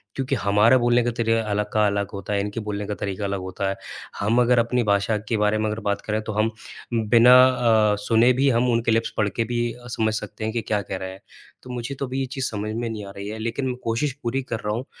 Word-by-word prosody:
क्योंकि 135 0 -1
हमारा 105 +3 +4
बोलने 120 0 +3
का 120 - 0
तरीका 115 -1 +2
अलग 105 0 -1
का 110 -1 +3
अलग 100 -1 -1
होता 100 +1 -4
है, 100 - +1
इनके 105 +2 -4
बोलने 105 -1 -4
का 105 - -2
तरीका 100 0 -4
अलग 100 0 -2
होता 95 +1 -3
है। 95 - -2 0.4
हम 110 +4 +2
अगर 125 0 +4
अपनी 120 +1 +1
भाषा 100 +1 +1
के 115 - +1
बारे 105 +1 +2
में 110 - -1
अगर 105 +1 -3
बात 100 0 -1
करें 110 0 -2
तो 110 - -5
हम 110 +2 +1 0.4
बिना 115 +2 +5 0.6
अ, - - +1
सुने 115 +3 +4
भी 135 +2 +2
हम 120 0 +2
उनके 115 0 +1
लिप्स 115 +1 +1
पढ़ 105 -1 +2
के 115 +4 -1
भी 120 0 -2 0.2
समझ 110 -1 +1
सकते 110 0 -5
हैं 110 +1 -2
कि 115 - -1
क्या 105 -2 -1
कह 95 0 -5
रहे 95 0 -6
हैं। 95 +1 -12 0.4
तो 125 - -12
मुझे 125 +2 -4
तो 135 - -3
अभी 130 +1 -4
ये 135 - 0
चीज़ 130 0 -4
समझ 105 0 -4
में 115 0 -2
नहीं 110 -2 -6
आ 100 - -9
रही 100 +1 -6
है। 110 +1 -5
लेकिन 115 +4 -2
मैं 125 - -2
कोशिश 115 +5 -1
पूरी 125 +3 -1
कर 115 -4 -4
रहा 105 - 0
हूँ 125 +3 -4
110 Hz, 265 wpm, -23 LUFS, 105-120 Hz, 0.6 s, बिना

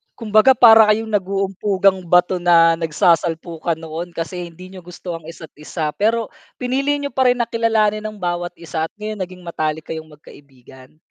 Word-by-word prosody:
Kumbaga, 225 +3 +4
para 225 -2 +7
kayong 220 +1 0
nag-uumpugang 195 0 0
bato 180 +1 +3
na 165 -1 +4
nagsasalpukan 165 +1 0
noon, 165 +2 -8
kasi 175 +1 -5
hindi 180 +3 -13
niyo 190 - -10
gusto 175 -1 -7
ang 160 -1 -15
isa't 165 -2 -11
isa, 150 0 -4
pero 225 +4 -1 0.2
pinili 270 +3 -1
niyo 285 - -4
pa 260 0 +2
rin 245 - +4
na 235 - -2
kilalanin 215 -2 +1
ang 215 0 -5
bawat 175 -2 -3
isa 160 -1 -4
at - - -47
ngayon 215 0 -6
naging 185 -1 -7
matalik 155 -2 -3
kayong 160 -1 -6
magkaibigan. 135 -2 -17
180 Hz, 170 wpm, -19 LUFS, 165-215 Hz, 0.2 s, para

